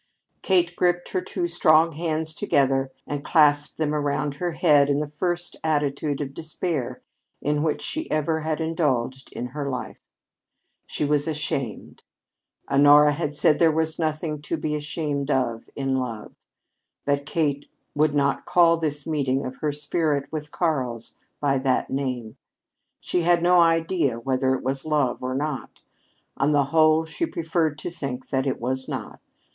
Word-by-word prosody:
Kate 175 -2 +2
gripped 175 -1 +1
her 185 - -1
two 175 -1 -3
strong 165 -1 +4
hands 160 0 -2
together 135 -3 +1
and 145 -1 -4
clasped 145 -2 +3
them 150 -1 0
about 145 -1 -1
her 175 0 -2
head 145 -2 +4
in 140 0 +2
the 150 -1 -4
first 175 -1 -2
attitude 145 -2 0
of 135 -1 -4
despair 160 -3 -4 0.4
in 150 0 0
which 155 -1 -1
she 315 +1 -4
ever 155 +1 0
had 155 0 -2
indulged 140 -6 -1
in 125 - -5
her 140 +1 -4
life. 125 -2 -5 0.9
She - - -2
was 145 0 +1
ashamed! 140 -6 -3 0.7
Honora 145 +1 +6
had 150 0 -3
said 150 +1 +3
there 165 -2 +5
was 160 +1 -1
nothing 155 -1 -2
to 155 +2 -3
be 150 0 -2
ashamed 150 -1 -3
of 120 -5 -1
in 135 -1 -1
love. 115 -4 -5 0.7
But 140 0 0
Kate 145 -3 -1 0.2
would 150 0 +2
not 140 -1 +1
call 170 -1 +5
this 150 -3 -3
meeting 140 -4 0
of 130 0 -6
her 150 -2 -1
spirit 145 -1 -1
with 150 -1 -5
Karl's 130 -9 -2 0.2
by 135 -2 +1
that 130 -1 0
name. 125 -5 -3 0.6
She 180 - 0
had 170 0 +3
no 180 0 +5
idea 165 -6 +2
whether 130 +1 +1
it - - -6
was 135 +1 -2
love 150 -5 0
or 130 0 -2
not. 150 +3 -4 0.6
On 145 +2 +2
the 145 -1 +4
whole, 155 0 +5
she 245 - -3
preferred 160 - -1
to 170 - -5
think 135 -6 -6
that 130 0 0
it 135 - -1
was 130 +2 -2
not. - - -6
150 Hz, 160 wpm, -24 LUFS, 135-160 Hz, 0.9 s, Honora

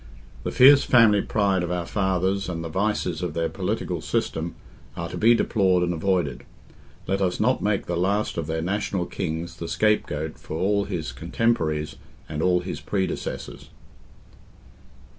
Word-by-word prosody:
The - - -2
fierce 140 +2 +7
family 110 -5 +5
pride 100 -3 +1
of 90 0 -3
our 90 -1 -2
fathers 95 0 0
and 85 -2 -4
the 85 - -5
vices 95 -2 -1
of 90 - -3
their 85 -1 0
political - - -3
system 80 +1 -2 0.4
are 85 - -3
to 90 - -7
be 115 +6 +5
deplored 95 -6 +2
and 90 0 0
avoided; 85 -5 -1 0.6
let 95 +1 -1
us 90 -2 0
not 125 +4 +2
make 105 -1 0
the 85 - -2
last 100 +5 0
of 80 -3 -3
their 80 0 -2
national 95 -1 -1
kings 85 -2 -4
the 85 - -5
scape 105 +5 +2
goat 75 +1 -5
for 80 - -6
all 100 +3 +1
his 85 -9 -4
cotemporaries 75 - -1 0.3
and 75 0 -4
all 90 0 +3
his 90 - -5
predecessors. 95 -2 -4
90 Hz, 160 wpm, -24 LUFS, 85-100 Hz, 0.6 s, fierce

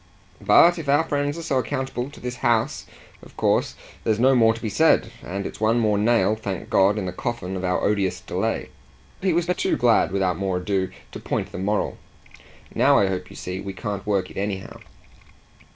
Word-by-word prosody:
But 175 0 +6
if 145 -4 -5
our 145 +3 +4
friends 145 -1 -1
are 165 - -6
so 140 -5 +1
accountable 130 0 -3
to - - -14
this 125 0 -5
house 120 +4 0 0.3
of - - -16
course - - +1 0.3
there's 110 -1 +1
no 130 +2 +5
more 115 -3 +5
to 115 - -10
be - - -1
said. 115 -2 +3
And 100 +2 -4
it's - - -7
one 110 +2 +3
more 105 -2 +2
nail, 110 -2 +3
thank 100 -4 -6
God, 100 +2 +4
in 100 - -2
the 90 - -3
coffin 95 -2 -4
of 95 - -4
our 90 0 0
odious 95 -3 0
delay." 90 - -2 0.5
He 190 0 +2
was 170 0 +1
but 180 +1 -1
too - - +1
glad 120 -5 +3
without 95 -3 0
more 95 -2 -1
ado 95 +1 -1 0.2
to - - -7
point - - -3
the - - -6
moral. 105 +2 -1 0.7
"Now - - +4
I 100 - +4
hope 90 -1 -4
you - - -12
see 90 +1 -5
we 100 0 -6
can't 100 +2 -5
work 100 -3 0
it - - -12
anyhow." 95 -1 -4
105 Hz, 205 wpm, -23 LUFS, 95-125 Hz, 0.7 s, But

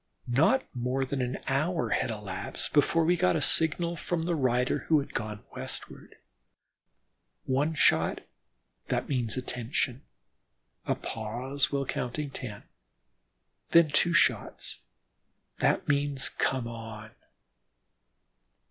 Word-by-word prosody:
Not 155 - +3
more 125 +2 0
than 135 0 -2
an 125 +1 -2
hour 155 +6 0
elapsed 105 -5 -2
before 155 +3 +4
we 175 +2 +4
got 90 - +2
a - - +2
signal 170 +2 +2
from 165 +1 -2
the 175 +1 0
rider 125 -4 +1
who 160 - +5
had 140 - -6
gone 105 -1 -4
westward. - - -8 1.3
One 145 +5 +1
shot: - - +3 0.7
that - - -1
means 120 -6 0
"attention," 125 +1 -2 0.9
a - - +2
pause 120 +6 -2
while 140 -1 0
counting 130 +4 -3
ten, 110 -7 -7 1.1
then 170 -2 +7
two 170 +4 +3
shots: - - +2 0.8
that - - +2
means 140 -1 0
"come 130 -3 -1
on." 110 -2 -8
135 Hz, 110 wpm, -29 LUFS, 120-150 Hz, 1.3 s, then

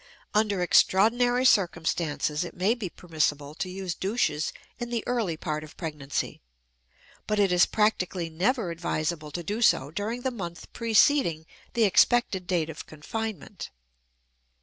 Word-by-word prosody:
Under 205 -3 +2
extraordinary 245 +8 +4
circumstances, 165 - +1
it 175 - -8
may 190 +5 +2
be 225 -7 -5
permissible 150 -4 -2
to 185 +3 -4
use 185 -1 -4
douches 190 -5 -1 0.3
in 240 -1 -4
the 235 -2 -2
early 225 -10 -1
part 155 0 -3
of 155 - -13
pregnancy, 150 -4 -4 0.9
but 210 - 0
it 200 -2 +3
is 180 0 +5
practically 185 -5 0
never 185 +5 0
advisable 160 -2 -2
to 170 +3 -5
do 210 +7 -3
so 145 - +3
during 215 +7 -3
the 260 0 -1
month 175 -8 -7
preceding 225 - +3 0.3
the 235 - +2
expected 200 -2 +3
date 165 -3 0
of 155 - -9
confinement. 210 +6 -6
185 Hz, 140 wpm, -27 LUFS, 160-220 Hz, 0.9 s, is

